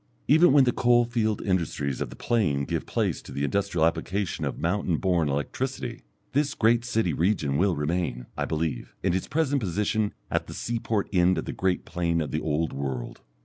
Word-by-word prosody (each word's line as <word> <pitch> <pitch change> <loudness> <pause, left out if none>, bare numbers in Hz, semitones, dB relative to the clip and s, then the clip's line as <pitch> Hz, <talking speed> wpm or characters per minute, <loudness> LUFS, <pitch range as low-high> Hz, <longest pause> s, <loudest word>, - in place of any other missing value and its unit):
Even 160 +4 +6
when 140 0 +7
the 125 - +3
coal 120 0 +4
field 110 -3 -1
industries 80 -7 -1
of - - -2
the - - -10
plain 85 -13 +1
give - - -3
place - - -1
to - - -12
the 70 - -3
industrial 80 +1 +1
application 90 +4 -1
of - - -3
mountain 85 -1 0
born 85 -5 +1
electricity, 120 - -3 0.3
this 145 +1 +1
great 115 +1 +3
city 115 -8 0
region 80 -4 +1
will 90 +3 +2
remain, 75 -5 -2
I - - -1
believe, 80 -6 -3
in 90 -2 +2
its 95 - -1
present 145 -3 +1
position 105 +2 0 0.2
at - - 0
the - - -8
seaport 115 -3 -1
end 90 0 +4
of 80 - -2
the - - -4
great 95 -1 0
plain 85 -2 0
of 75 - -2
the 75 - -1
Old 80 +1 -1
World. 65 -3 -4
90 Hz, 190 wpm, -26 LUFS, 80-115 Hz, 0.3 s, when